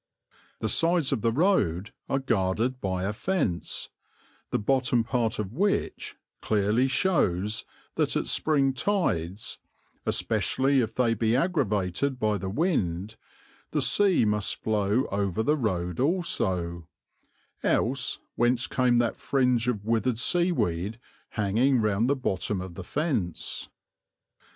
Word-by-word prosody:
The 110 - 0
sides 165 +4 +2
of 130 -6 0
the 115 - +2
road 115 - +1 0.2
are 135 - +1
guarded 115 0 0
by 95 -1 -2
a 100 +2 -1
fence, 105 - -1 0.6
the - - 0
bottom 125 +1 +1
part 115 -1 -1
of 105 -1 -4
which 200 +8 -1 0.3
clearly 110 +4 +2
shows 105 - +1 0.3
that - - +2
at - - 0
spring 140 -4 +2
tides, 110 - -1 0.5
especially 135 0 +2
if 115 -1 -3
they 120 -2 +2
be 115 +1 +1
aggravated 130 - 0
by 105 -2 +1
the 95 +1 -4
wind, 105 - -1 0.5
the - - 0
sea 195 - +3
must 105 -1 0
flow 105 +3 +1
over 100 +1 0
the 150 +6 +2
road 90 - -2
also; 95 - 0 0.7
else - - 0 0.2
whence 120 +1 +2
came 125 -2 +2
that 120 -1 +1
fringe 125 -3 +1
of 105 -5 -1
withered 115 +1 +1
seaweed 115 - +1 0.3
hanging 120 +5 +2
round 110 +2 +1
the 140 - +3
bottom 105 -6 -2
of 90 -1 -7
the 95 - -7
fence? 135 - -2
115 Hz, 125 wpm, -27 LUFS, 100-135 Hz, 0.7 s, sea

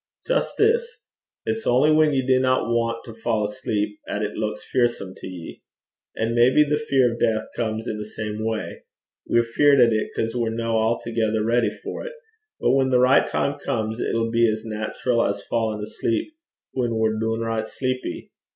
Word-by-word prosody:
'Jist - - 0
this: 470 +2 +1 0.4
it's 225 0 -2
only 130 +5 +4
whan 155 0 +4
ye 135 -2 0
dinna 130 0 +3
want 115 0 -1
to 115 - -9
fa' 115 -1 -1
asleep 105 -2 -2
'at 105 - -2
it 105 - -2
luiks 110 0 -3
fearsome 120 -7 0
to - - -9
ye. 90 -3 -9 0.6
An' 115 +1 0
maybe 125 +5 +5
the 150 0 0
fear 135 -5 +2
o' - - -7
death 110 -1 +1
comes 110 0 -2
i' - - -1
the 105 0 -5
same 110 0 -5
way: 110 -1 -3 0.5
we're 120 - +3
feared 140 +4 +4
at 120 -2 +6
it 110 - 0
'cause 115 +1 -2
we're 120 -2 0
no 115 0 -1 0.2
a'thegither 110 -2 -1
ready 120 +1 +2
for - - -7
't; - - -6 0.5
but - - +2
whan 135 0 +3
the 130 - +4
richt 125 +2 +4
time 140 +1 -1
comes, 110 -5 -2
it'll 115 0 0
be 115 0 +4
as 110 +1 -5
nat'ral 110 +2 -1
as 100 0 -2
fa'in' 110 -2 -1
asleep 115 - -2 0.4
whan 120 -3 -1
we're 110 -1 +1
doonricht 115 0 -1
sleepy. 130 +1 -4
115 Hz, 180 wpm, -23 LUFS, 110-130 Hz, 0.6 s, at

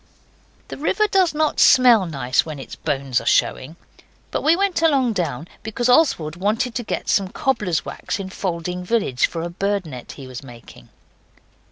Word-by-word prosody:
The - - -7
river 385 +8 +1
does 375 -5 +2
not 310 0 0
smell 240 -7 +6
nice 135 -4 0
when 155 -2 -7
its 135 - -9
bones 135 -4 -1
are - - -11
showing. 150 +6 +1 0.6
But - - -1
we 320 +2 +4
went 390 -2 0
along 275 -7 +3
down, 165 -5 -3
because 230 +3 -2
Oswald 245 - +3
wanted 215 +6 -1
to 240 - -3
get - - -4
some 195 -2 +2
cobbler's 210 - -1
wax - - -5
in 190 -1 -6
Falding 180 -1 -4
village 180 - +1
for 165 -1 -5
a 170 - -3
bird 200 +1 -1
net 130 -6 -9
he 135 - -10
was 130 -1 -8
making. 120 -4 -14
190 Hz, 175 wpm, -21 LUFS, 155-255 Hz, 0.6 s, smell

